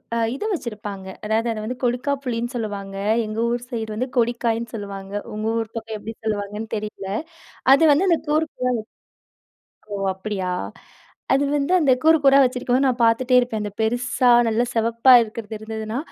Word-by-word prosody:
அ - - 0 0.2
இத - - -5
வச்சிருப்பாங்க. 210 - -6 0.2
அதாவது, 220 +2 0
அத 215 - -6
வந்து 250 +3 -4
கொடுக்காப்புளின்னு 245 -1 -1
சொல்லுவாங்க. 200 -4 -4 0.3
எங்க 215 +1 -4
ஊர் 240 0 -2
சைடு 225 -3 -4
வந்து 255 +4 -2
கொடிக்காய்ன்னு 235 -1 0
சொல்லுவாங்க. 200 -2 -7 0.2
உங்க 215 +1 -3
ஊர் 225 -1 -5
பக்கம் 225 -1 -5
எப்பிடி 220 +2 -8
சொல்லுவாங்கன்னு 210 +1 -3
தெரியல. 210 -2 -6 0.7
அது 280 - +3
வந்து 365 +7 +3
அந்த 335 - +4
கூறு 310 +2 +2
கூறா 250 0 0 1.2
ஓ - - -3 0.2
அப்படியா. 190 -2 -3 0.8
அது 275 +1 +3
வந்து, 285 +3 0
அந்த 290 -5 +3
கூறு 320 +1 +6
கூறா 275 0 +6
வச்சுருக்கும்போது, 250 +1 +1
நான் 250 -1 0
பாத்துட்டே 245 +3 +3
இருப்பேன். 245 -3 -2
அந்த 205 - -4
பெருசா, 245 +2 +1 0.2
நல்லா 225 +2 +1
சிவப்பா 230 +3 +4
இருக்கிறது 220 0 -7
இருந்ததுனா, 220 +1 -5
230 Hz, 155 wpm, -22 LUFS, 215-250 Hz, 1.2 s, கூறு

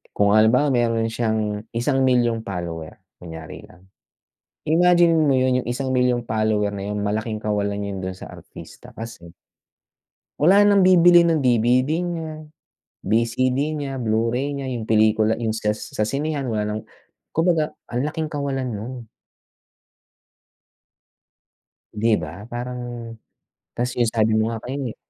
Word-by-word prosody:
Kung 100 0 +3
halimbawa 125 +7 +4
meron 115 -3 +1
siyang, 110 -2 -2
isang 130 +3 +1
milyong 120 -3 +1
follower, 85 -4 -6 0.2
kunyari 80 -3 -10
lang. 95 +1 -21 0.8
Imagine 175 +1 +4
mo 155 -3 +3
yun 130 -1 +2
yung - - -11
isang 130 +2 -3
milyong 125 -2 +1
follower 110 -1 +1
na 100 - -5
yung 105 - -3
malaking 110 +2 -2
kawalan 105 -1 -1
yun 100 -2 -4
dun 95 - -3
sa 95 - -10
artista - - -13
kasi 115 -7 -9 1.1
wala 195 +6 +6
nang 200 -1 +5
bibili 175 -1 +7
ng 165 -5 +1
DVD 125 +2 +3
niya, 165 -3 -4 0.7
VCD 115 +4 +1 0.2
niya, 140 -3 -4
Blu-ray 115 +4 -1
niya, 140 -1 -4
yung 120 -3 -4
pelikula 110 0 +3
yung 115 - -1
sas 105 -1 -3
sa 105 - +2
sinehan 145 +2 -2
wala 110 -3 -1
nang - - -6 0.5
kumbaga 165 -2 +1 0.2
ang 125 +3 -1
laking 155 +1 -3
kawalan 135 -3 -2
nun. 110 +3 -5 3.0
'Di 110 +2 +1
ba 75 - -6 0.2
parang 120 -1 -6 0.6
tas 125 +1 -1
yung 120 - +3
sabi 110 -1 +1
mo 110 - +1
nga 115 -1 -5
kanina 130 -2 -4
120 Hz, 135 wpm, -22 LUFS, 110-140 Hz, 3.0 s, bibili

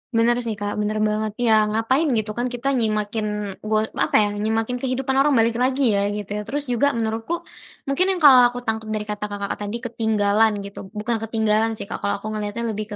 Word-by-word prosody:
Benar 235 +1 +3
sih, 220 - -2
Kak, 205 0 -4
bener 215 +1 0
banget. 215 0 -1
Ya, 220 -3 +3
ngapain 225 +9 +1
gitu, 215 -1 -1
kan, 240 +3 -2
kita 250 +3 -2
nyimakin 210 -3 -1
go 215 0 0 0.2
apa, - - +1
ya, 205 - 0
nyimakin 220 +4 -1
kehidupan 265 +1 -1
orang, 280 0 +4
balik 230 +1 +2
lagi, 260 -1 +2
ya, 200 0 +1
gitu, 205 -1 -5
ya. - - -3
Terus 285 0 -3
juga, 280 +2 +2
menurutku 225 +9 -2 0.4
mungkin 365 +8 +1
yang 355 - -5
kalau 255 -4 +9
aku 245 0 -6
tangkap 220 -2 -3
dari 210 - -2
kata 210 0 -4
Kakak 200 -1 -4
tadi 205 +2 -4
ketinggalan 220 -2 +1
gitu 200 -1 -9
bukan 225 +2 -1
ketinggalan 220 0 0
sih, - - -6
Kak, - - -6
kalau 200 - -1
aku 215 - -4
ngelihatnya 215 +2 -3
lebih 210 0 -5
220 Hz, 205 wpm, -22 LUFS, 210-245 Hz, 0.4 s, kalau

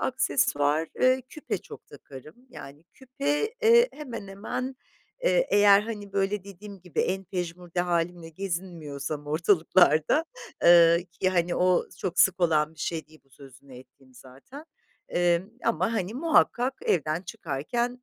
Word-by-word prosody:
aksesuar, 150 - 0
eee, 255 0 +3
küpe 305 - -5
çok - - -13
takarım. 140 +3 -13 0.2
Yani 145 -3 -12
küpe, 280 - -2
eee, 470 +2 +6
hemen 235 -9 -8
hemen, 255 +7 -5 0.5
eee, - - +2
eğer 205 0 +6
hani 210 -3 -7
böyle 195 0 -1
dediğim 200 0 -11
gibi, 180 -3 -3
en 190 +1 -2
pejmürde 175 -1 -4
hâlimle 175 -1 -2
gezinmiyorsam 160 -5 -5
ortalıklarda 165 - +3 0.4
eee, 170 0 +6
ki, 185 - +3
hani, 175 -1 0
o 180 0 +2
çok 185 -1 -1
sık 185 -1 +3
olan 155 -2 +2
bir 160 - -14
şey 160 0 -3
değil 155 -3 -20
bu 135 - -34
sözünü 135 0 -16
ettiğim 130 0 -20
zaten. 135 - -13 0.4
Emm, 175 +2 +1
ama, 185 +7 0
hani, 205 -1 -3
muhakkak 265 -3 +2
evden 155 0 0
çıkarken 195 - -4
180 Hz, 135 wpm, -26 LUFS, 160-210 Hz, 0.5 s, eee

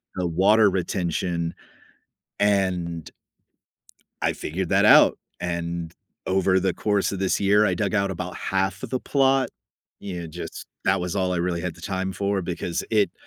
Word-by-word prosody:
the 90 -1 -1
water 100 +5 +4
retention, 85 -2 -1 0.9
and 90 -5 0 1.1
I - - +2
figured 90 +3 -4
that - - +4
out. - - +7 0.2
And 85 -1 -3 0.3
over 95 0 +2
the 95 -1 0
course 105 -2 0
of 100 - -4
this 95 -1 +1
year, 105 +2 +4
I 95 - +2
dug 100 +3 -1
out 100 -2 +1
about 90 0 -5
half 95 0 -1
of - - -5
the 130 - -1
plot. 135 -1 +2 0.5
Yeah. 90 -4 -5
Just 85 +2 -7 0.2
that 95 0 +3
was 90 0 -3
all 95 -2 +1
I - - -1
really 85 0 -1
had 90 -1 -4
the 80 - -15
time 95 +1 -2
for 100 0 -1
because 85 -1 -3
it 105 -3 +2
95 Hz, 165 wpm, -24 LUFS, 85-100 Hz, 1.1 s, out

